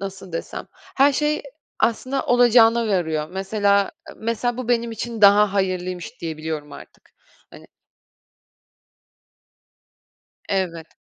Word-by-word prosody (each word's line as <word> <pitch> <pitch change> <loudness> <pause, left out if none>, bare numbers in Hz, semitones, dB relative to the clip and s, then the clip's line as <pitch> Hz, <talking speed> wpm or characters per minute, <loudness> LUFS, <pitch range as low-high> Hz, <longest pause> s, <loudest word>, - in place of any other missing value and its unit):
nasıl 195 -2 -8
desem? 165 - -5 0.3
Her 275 +1 +5
şey 300 +2 0 0.4
aslında 255 +4 0
olacağına 235 -2 +5
varıyor. 160 -6 -1
Mesela 200 +1 +1 0.3
mesela, 230 +2 -2
bu 255 -2 -5
benim 235 -1 +1
için 230 0 -5
daha 205 0 +6
hayırlıymış 185 +3 -3
diyebiliyorum 155 -2 -5
artık. - - -14 0.4
Hani - - -14 2.8
Evet. 170 -4 -2
200 Hz, 100 wpm, -22 LUFS, 180-235 Hz, 2.8 s, daha